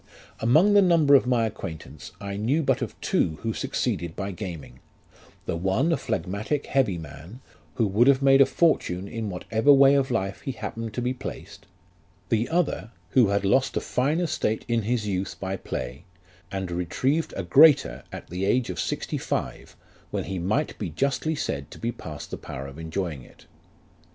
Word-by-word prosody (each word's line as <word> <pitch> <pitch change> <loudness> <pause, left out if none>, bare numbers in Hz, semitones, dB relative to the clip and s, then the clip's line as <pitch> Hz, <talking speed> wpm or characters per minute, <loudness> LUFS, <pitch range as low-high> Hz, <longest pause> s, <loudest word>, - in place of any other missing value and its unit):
" - - -26
Among 180 +11 +5
the 205 - +7
number 165 -6 +4
of 135 -2 +6
my 120 -2 +2
acquaintance, 80 -8 -7
I 100 -1 -5
knew 125 +10 +1
but - - +1
of - - -5
two 80 - +1
who 115 -1 -1
suc - - -5
ceeded 85 -1 -1
by 100 +1 -3
gaming; 85 -9 -7 0.7
the - - -2
one 95 - +1
a - - +4
phlegmatic 110 +6 -2
heavy 130 -10 +1
man, 80 - -10 0.4
who 115 - +2
would 105 +5 +3
have 140 -1 +5
made 135 0 +6
a 135 - +7
fortune 100 - +1
in 115 -1 -4
whatever 110 +8 +2
way 140 0 +7
of 140 -1 +2
life 100 -5 -2
he 135 - -4
happened 115 0 -6
to 125 - -2
be 125 +1 0
placed; 130 +1 -9 0.6
the 115 +1 +1
other 160 - 0 0.2
who 125 -5 +5
had 100 0 0
lost 130 +7 +2
a - - +3
fine 145 +6 0
estate 125 -10 -1
in 115 -1 +1
his 115 +1 -1
youth 95 -1 -3
by 95 0 -3
play, 65 -6 -5 0.5
and 95 -2 -3
retrieved 130 - 0
a 95 - -2
greater 90 - +5
at - - -8
the 90 +2 -3
age 115 +2 +1
of 90 - -6
sixty - - -2
five, - - -4 0.3
when - - -2
he 95 -1 -4
might 110 - 0
be - - -3
justly 140 +3 -1
said 70 - -3
to - - -11
be 115 - -2
past 75 -9 -9
the - - -4
power 65 - -7
of 70 +3 -10
enjoying 80 -3 -3
it. - - -18
110 Hz, 190 wpm, -25 LUFS, 90-135 Hz, 0.7 s, the